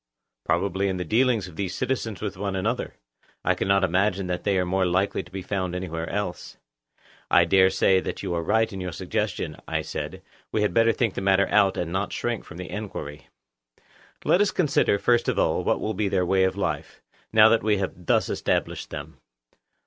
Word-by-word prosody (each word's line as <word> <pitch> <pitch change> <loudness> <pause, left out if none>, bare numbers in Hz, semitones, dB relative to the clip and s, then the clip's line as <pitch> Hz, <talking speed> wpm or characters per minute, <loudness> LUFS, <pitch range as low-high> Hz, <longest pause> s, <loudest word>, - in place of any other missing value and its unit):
Probably 95 +3 0
in 95 -1 -1
the 90 - -3
dealings 115 0 +2
of 90 - -12
these 95 -2 -3
citizens 120 -6 -2
with 100 -3 -3
one 100 +1 -3
another. 95 - -2 0.5
I - - +4
cannot 100 0 +1
imagine 95 +2 +1
that 90 0 -3
they 100 -2 +2
are 90 - +1
more 95 +1 +1
likely 95 +3 +1
to 85 - -15
be 95 +1 -6
found 95 -2 -2
any 90 +1 -3
where 80 +1 -4
else. 100 -3 -4 0.7
I 85 - +5
dare 95 +2 +5
say 95 0 +3
that - - -5
you 95 -3 -2
are 85 - -1
right 110 +6 +1
in 95 - -5
your 90 -2 -4
suggestion, 95 -3 -3
I - - -1
said; 80 +5 -6 0.3
we 110 - +1
had 105 - 0
better 115 0 +4
think 115 -2 0
the - - -4
matter 95 0 +3
out, 95 -1 +3
and 85 -1 -2
not 95 +3 -2
shrink 120 -2 -2
from 85 - -11
the 90 -3 -7
enquiry. 90 -8 -6 1.0
Let 180 - +4
us 205 - +3
then - - -9
consider, 140 -8 +2
first 120 +3 +2
of - - -1
all, - - +1
what - - +1
will 110 - -2
be 100 +1 -1
their 95 -2 +1
way 95 +1 +3
of 95 - -1
life, - - -3 0.3
now 110 0 +7
that 115 0 +3
we 105 -1 +2
have 95 -2 -5
thus - - +3
established - - -1
them. - - -8
95 Hz, 210 wpm, -25 LUFS, 90-105 Hz, 1.0 s, now